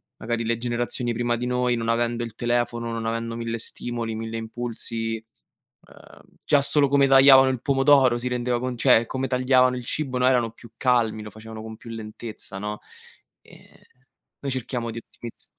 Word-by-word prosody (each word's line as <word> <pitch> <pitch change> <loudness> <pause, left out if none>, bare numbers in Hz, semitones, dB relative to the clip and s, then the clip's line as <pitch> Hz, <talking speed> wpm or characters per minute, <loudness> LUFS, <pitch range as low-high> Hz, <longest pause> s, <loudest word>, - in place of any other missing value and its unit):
magari 115 0 -3
le 115 +1 +1
generazioni 120 0 -1
prima 120 +1 0
di 120 +1 -3
noi, 125 0 +1
non 115 -1 -3
avendo 120 0 0
il 115 -2 -7
telefono, 120 0 -1
non 115 0 -4
avendo 115 0 -3
mille 115 0 -3
stimoli, 115 0 -4
mille 115 0 -5
impulsi, 115 -1 -3 0.7
uhm, - - -17 0.2
già 145 -2 +3
solo 140 0 +4
come 140 0 +4
tagliavano 135 0 +7
il 130 -2 -2
pomodoro, 135 -2 +4
si 125 +1 -3
rendeva 125 0 -1
con 125 0 -3
cioè 120 -2 +5
come 130 +3 -3
tagliavano 130 0 +3
il 125 - -6
cibo, 135 -1 -2
no, 125 0 +2
erano 125 -3 +3
più 115 0 -16
calmi, 115 -4 +1
lo 105 - -8
facevano 110 +1 -10
con 110 0 -8
più 115 +1 -12
lentezza, 110 -2 -8
no? 105 +1 -4 0.6
Ehm, - - -18 0.7
noi 140 - -3
cerchiamo 120 -2 -3
di 115 - -6
ottimizz 115 0 -10
120 Hz, 175 wpm, -24 LUFS, 115-125 Hz, 0.7 s, tagliavano